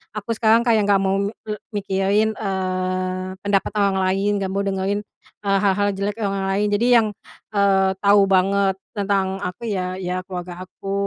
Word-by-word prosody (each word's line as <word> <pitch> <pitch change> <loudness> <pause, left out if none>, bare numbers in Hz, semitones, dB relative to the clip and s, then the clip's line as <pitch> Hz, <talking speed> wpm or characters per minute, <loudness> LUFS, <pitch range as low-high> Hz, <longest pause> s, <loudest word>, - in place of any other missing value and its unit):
aku 210 +2 -4
sekarang 225 +1 +3
kayak 220 -3 +3
nggak 195 -1 +4
mau 195 0 +1
me 200 +2 -2 0.2
eee, 210 - -2 0.2
mikirin, 200 +2 +1
eee, 185 -1 -2 0.2
pendapat 200 -1 +1
orang 200 -2 +2
lain, 195 +2 +1
nggak 190 -1 -2
mau 200 - 0
dengerin, 195 +1 -1 0.4
eee, 195 -1 +2
hal-hal 205 +1 +2
jelek 200 +1 -3
orang-orang 195 -1 -1
lain. 210 +1 +1
Jadi 220 +4 +2
yang, 225 -2 +5 0.5
eee, 195 -1 +3
tahu 200 0 +5
banget 195 +1 +3 0.2
tentang 195 -1 0
aku 180 +6 -5
ya 185 -2 -2
ya 180 0 -2
keluarga 180 -1 -6
aku 195 +2 -7
195 Hz, 170 wpm, -21 LUFS, 190-205 Hz, 0.5 s, yang